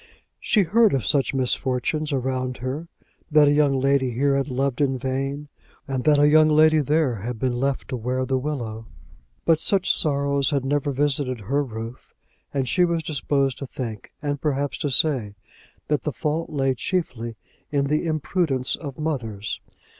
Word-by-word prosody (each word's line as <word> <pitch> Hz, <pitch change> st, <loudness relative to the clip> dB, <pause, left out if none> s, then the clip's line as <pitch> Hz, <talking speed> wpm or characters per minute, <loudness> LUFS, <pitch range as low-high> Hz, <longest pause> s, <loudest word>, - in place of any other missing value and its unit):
She 210 Hz, -, +3 dB
heard 210 Hz, +1 st, +4 dB
of 130 Hz, -, -1 dB
such 140 Hz, -3 st, +2 dB
misfortunes 130 Hz, +3 st, 0 dB
around 130 Hz, -1 st, -1 dB
her, 135 Hz, +7 st, -4 dB, 0.4 s
that 150 Hz, -1 st, +6 dB
a -, -, +5 dB
young 145 Hz, -2 st, +3 dB
lady 135 Hz, -1 st, +2 dB
here 135 Hz, +4 st, +1 dB
had 140 Hz, 0 st, 0 dB
loved 135 Hz, +1 st, -1 dB
in 135 Hz, -2 st, +2 dB
vain, 135 Hz, +3 st, -3 dB, 0.4 s
and 130 Hz, -2 st, -2 dB
that 150 Hz, -1 st, +5 dB
a 145 Hz, 0 st, +5 dB
young 155 Hz, +1 st, +6 dB
lady 155 Hz, +1 st, +5 dB
there 145 Hz, -4 st, +1 dB
had 115 Hz, +4 st, -5 dB
been 120 Hz, +1 st, -1 dB
left 135 Hz, +1 st, -1 dB
to -, -, -2 dB
wear 125 Hz, +3 st, -1 dB
the 130 Hz, 0 st, 0 dB
willow; 115 Hz, -6 st, -4 dB, 0.6 s
but 165 Hz, -2 st, +4 dB
such 190 Hz, +2 st, +2 dB
sorrows 140 Hz, -2 st, +1 dB
had 140 Hz, -3 st, 0 dB
never 145 Hz, +1 st, 0 dB
visited 135 Hz, -3 st, 0 dB
her 140 Hz, +8 st, 0 dB
roof, 115 Hz, -1 st, -8 dB, 0.4 s
and 135 Hz, -2 st, -1 dB
she 180 Hz, +9 st, +3 dB
was 170 Hz, -2 st, +1 dB
disposed 140 Hz, -3 st, 0 dB
to 140 Hz, -, -5 dB
think, 115 Hz, -6 st, -6 dB
and 145 Hz, -1 st, -2 dB
perhaps 145 Hz, -2 st, -1 dB
to 145 Hz, -, -1 dB
say, 125 Hz, -6 st, +1 dB, 0.5 s
that 150 Hz, -1 st, +1 dB
the 150 Hz, -, -2 dB
fault 155 Hz, +3 st, -2 dB
lay 135 Hz, -3 st, +1 dB
chiefly 125 Hz, -, -3 dB, 0.4 s
in 140 Hz, -1 st, +1 dB
the 150 Hz, +4 st, 0 dB
imprudence 155 Hz, -4 st, 0 dB
of 140 Hz, -4 st, -8 dB
mothers. 115 Hz, -10 st, -3 dB
140 Hz, 170 wpm, -24 LUFS, 130-150 Hz, 0.6 s, that